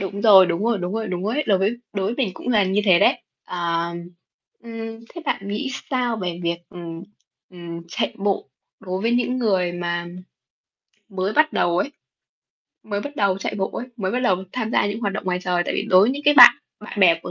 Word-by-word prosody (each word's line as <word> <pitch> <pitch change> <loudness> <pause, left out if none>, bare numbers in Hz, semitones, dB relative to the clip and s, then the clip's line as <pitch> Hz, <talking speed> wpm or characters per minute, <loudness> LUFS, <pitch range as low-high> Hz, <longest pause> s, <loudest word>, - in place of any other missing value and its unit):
Đúng 195 +1 -4
rồi, 195 -4 +8
đúng 175 +4 -2
rồi, 230 -3 +1
đúng 180 +2 -4
rồi, 225 -1 -2
đúng 180 +1 -3
rồi 220 +4 -1
ấy, 300 0 -1
đối 195 -3 +3
với 205 +5 0 0.2
đối 195 -2 -2
với 230 - -2
mình 245 -8 -1
cũng - - -8
là 210 -5 +3
như 190 +2 +1
thế 180 -4 +5
đấy. - - +3 0.2
Ờ, 170 -1 -2 0.8
ừm, 225 -1 -7
thế 340 - -8
bạn 200 -7 -2
nghĩ 240 +7 -3 0.2
sao 245 -3 0
về 180 -3 -4
việc, 170 0 -1
ừm, 170 -1 -8 0.5
ừm, 170 -2 -8
chạy - - -2
bộ 195 -6 -1 0.3
đối 185 0 -4
với 230 - +1
những 250 +1 0
người 190 -7 +1
mà 175 0 -3 1.0
mới 190 0 -2
bắt 310 +4 +3
đầu 175 0 +1
ấy, 280 - -1 0.9
mới 205 -2 -4
bắt 285 +5 -8
đầu 195 -2 +1
chạy - - -4
bộ 190 - -1
ấy, 245 - -6
mới 190 -4 -2
bắt 250 - -1
đầu 195 -7 +2 0.2
tham 225 -3 -3
gia - - +2
những 205 +2 -4
hoạt 200 -4 -1
động 210 - -5
ngoài 180 -1 -1
trời? 175 -1 0
Tại - - -3
vì - - -2
đối 185 - +7
với 210 +5 +4
những 280 +2 -4
cái 295 0 +5
bạn 245 -3 +11 0.3
bạn 210 -1 -7
bè 170 -3 +6
của - - -7
195 Hz, 230 wpm, -22 LUFS, 180-230 Hz, 1.0 s, bạn